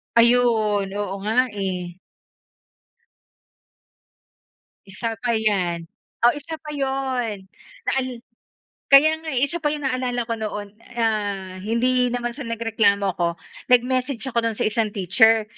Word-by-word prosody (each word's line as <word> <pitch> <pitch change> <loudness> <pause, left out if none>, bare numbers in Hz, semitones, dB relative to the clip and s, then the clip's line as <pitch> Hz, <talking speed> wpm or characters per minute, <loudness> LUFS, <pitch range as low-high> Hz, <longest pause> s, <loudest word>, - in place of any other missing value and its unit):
Ayun. 230 -4 +4
Oo 205 -2 -2
nga, 250 +5 +2
eh. 185 -3 -4 2.9
Isa 225 +3 -4
pa 240 +1 -1
'yan 185 -7 0 0.4
o - - +9
isa 295 +2 -6
pa 305 - -10
'yon. 260 -7 -2 0.4
Naan 265 -1 +1 0.8
kaya 310 +3 +6
nga, 320 - -12
eh, 250 - +2
isa 310 +5 -1
pa 310 - 0
'yon. 295 -1 -4
Naalala 255 -2 -1
ko 230 0 -3
noon, 210 -2 -5 0.2
ah, 205 -5 -1
hindi 250 +5 +1
naman 240 0 -2
sa 280 +4 -7
nagreklamo 225 -3 +1
ako. 175 - +1 0.4
Nag-message 250 0 +2
ako 235 - +2
do'n 230 -1 0
sa - - -1
isang 215 -1 -1
teacher. 220 +4 +4
230 Hz, 125 wpm, -23 LUFS, 205-255 Hz, 2.9 s, o